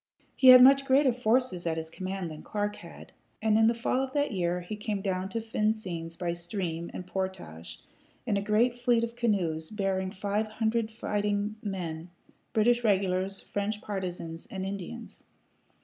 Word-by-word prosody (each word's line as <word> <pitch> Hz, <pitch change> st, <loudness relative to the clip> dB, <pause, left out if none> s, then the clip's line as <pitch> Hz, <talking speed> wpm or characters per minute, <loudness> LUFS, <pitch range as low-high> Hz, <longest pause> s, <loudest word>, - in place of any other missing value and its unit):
He 260 Hz, -, +4 dB
had 255 Hz, 0 st, +11 dB
much 275 Hz, +1 st, +7 dB
greater 270 Hz, -1 st, +4 dB
forces 235 Hz, -6 st, +1 dB
at 165 Hz, -1 st, 0 dB
his 160 Hz, 0 st, -5 dB
command 185 Hz, -2 st, -4 dB
than 155 Hz, -, -9 dB
Clark 210 Hz, -1 st, -3 dB
had; -, -, -12 dB, 0.3 s
and 220 Hz, -1 st, +2 dB
in 220 Hz, 0 st, +5 dB
the 230 Hz, -, +3 dB
fall 235 Hz, +2 st, 0 dB
of 265 Hz, 0 st, -4 dB
that 290 Hz, -2 st, +1 dB
year 180 Hz, -3 st, -1 dB
he 175 Hz, +5 st, -6 dB
came 210 Hz, -1 st, -3 dB
down 190 Hz, -1 st, -2 dB
to 230 Hz, -, -2 dB
Vincennes 210 Hz, -7 st, -2 dB
by 170 Hz, -1 st, -2 dB
stream 170 Hz, -1 st, -4 dB
and 180 Hz, -, -7 dB
portage, 180 Hz, -, -5 dB, 0.5 s
in 205 Hz, -, +1 dB
a 200 Hz, -, +1 dB
great 230 Hz, +4 st, +2 dB
fleet 240 Hz, -1 st, +3 dB
of 235 Hz, 0 st, -3 dB
canoes 180 Hz, -9 st, 0 dB
bearing 195 Hz, -3 st, -1 dB
five 205 Hz, +3 st, -2 dB
hundred 220 Hz, +1 st, -1 dB
fighting 210 Hz, -1 st, -1 dB
men 175 Hz, -4 st, -5 dB, 0.4 s
British 240 Hz, +2 st, +3 dB
regulars, 195 Hz, -2 st, +1 dB
French 205 Hz, +1 st, -3 dB
partizans, 180 Hz, -5 st, -5 dB
and 190 Hz, -1 st, -5 dB
Indians. 200 Hz, +4 st, -7 dB
205 Hz, 165 wpm, -29 LUFS, 180-225 Hz, 0.5 s, had